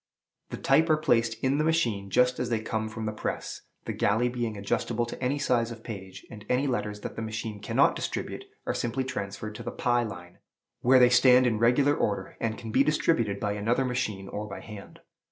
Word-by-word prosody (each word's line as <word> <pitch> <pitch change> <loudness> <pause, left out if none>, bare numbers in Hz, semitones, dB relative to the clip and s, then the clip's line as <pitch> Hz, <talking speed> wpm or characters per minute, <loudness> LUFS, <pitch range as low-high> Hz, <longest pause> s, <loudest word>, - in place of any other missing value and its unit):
The - - -5
type 155 +5 +3
are 155 - +5
placed 115 -6 +2
in 135 +2 +2
the - - +3
machine 115 -12 +1
just 125 +5 +3
as 125 - -1
they 115 -2 +1
come 110 0 -3
from 110 0 -5
the 110 - -1
press, 105 - -4 0.2
the - - -3
galley 110 +4 +2
being 120 -3 -3
adjustable 115 +4 -1
to 120 - -7
any 130 +3 +1
size 120 -5 +1
of 115 -1 -9
page; 95 -4 -8
and 105 -3 -10
any 125 +3 +2
letters 105 -6 -2
that - - -6
the - - -4
machine 110 -1 -4
cannot - - +2
distribute - - -4 0.2
are - - 0
simply 120 +3 -1
transferred 105 -4 -5
to - - -8
the - - -4
"pi 120 -1 +1
line," 90 -6 -7 0.4
where 130 +2 +5
they 125 -1 +7
stand 125 +1 +6
in 115 -3 +1
regular 130 +5 +4
order, 100 -2 -2
and 110 -1 -2
can 115 -2 -7
be 130 +5 +4
distributed 120 -9 +1
by 105 - -1
another 115 +6 0
machine 110 -6 -2
or 105 +1 -5
by 95 - -7
hand. 105 -3 -11
115 Hz, 210 wpm, -28 LUFS, 105-125 Hz, 0.4 s, they